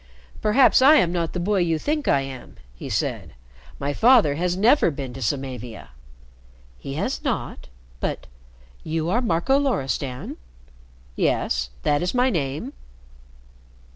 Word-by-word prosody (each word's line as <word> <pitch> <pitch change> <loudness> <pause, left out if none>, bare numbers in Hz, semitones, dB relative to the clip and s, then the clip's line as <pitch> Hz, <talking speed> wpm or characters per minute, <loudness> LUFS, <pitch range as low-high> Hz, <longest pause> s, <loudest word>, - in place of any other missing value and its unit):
"Perhaps 255 +5 +5
I 285 +4 +8
am 175 - +3
not 170 -2 -2
the 180 - -3
boy 200 +3 +1
you 165 -2 +1
think 300 - -2
I 140 - +3
am," 135 -2 -9 0.2
he - - -8
said. - - -3 0.4
"My 145 +1 -2
father 230 - +5
has 175 +4 -1
never 230 +4 +4
been 135 -4 -6
to 135 - -9
Samavia." 125 -2 -4 0.9
"He - - -6
has - - -3
not? - - -3 0.3
But - - -3 0.6
you 160 +1 -2
are 240 +5 +2
Marco 235 +5 +1
Loristan?" 135 - -2 0.8
"Yes. 60 0 0
That 145 0 +1
is 180 +6 -2
my 250 +1 +3
name." 145 -4 -3
165 Hz, 140 wpm, -23 LUFS, 135-225 Hz, 0.9 s, I